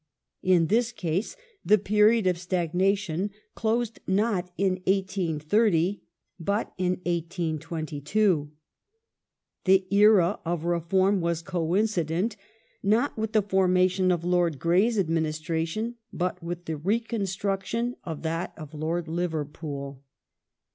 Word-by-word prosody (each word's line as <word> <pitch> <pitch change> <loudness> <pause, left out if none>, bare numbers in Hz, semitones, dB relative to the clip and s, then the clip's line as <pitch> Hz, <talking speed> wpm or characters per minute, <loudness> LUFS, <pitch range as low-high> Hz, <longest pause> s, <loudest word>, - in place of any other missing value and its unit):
In 180 -3 +4
this 230 +6 +2
case 185 - -2 0.3
the 210 - +5
period 210 +2 +3
of 180 -2 +1
stagnation 180 +1 0 0.2
closed 230 0 -1
not 190 -2 +1
in 190 -2 +1
1830, 190 0 +1 0.4
but 200 +6 -1
in 180 -1 +2
1822; 165 0 -1 1.2
the 190 0 +5
ei 200 +1 +5
a 205 -3 +5
of 170 -1 -2
reform 185 +3 +2
was 170 -1 -1
coincident 180 +2 0 0.5
not 220 +7 +2
with 220 0 -3
the 215 -2 +4
formation 185 -1 +3
of 175 -2 0
Lord 175 -4 +2
Grey's 185 - +2
administration, 165 +5 -1
but 180 0 -2
with 175 +1 -5
the 160 -1 -3
reconstruction 205 +3 -1
of 160 -2 -6
that 165 +2 -2
of 155 -1 -9
Lord 160 +2 -2
Liver 165 -2 -1
pool. 140 -2 -7
180 Hz, 115 wpm, -27 LUFS, 165-205 Hz, 1.2 s, the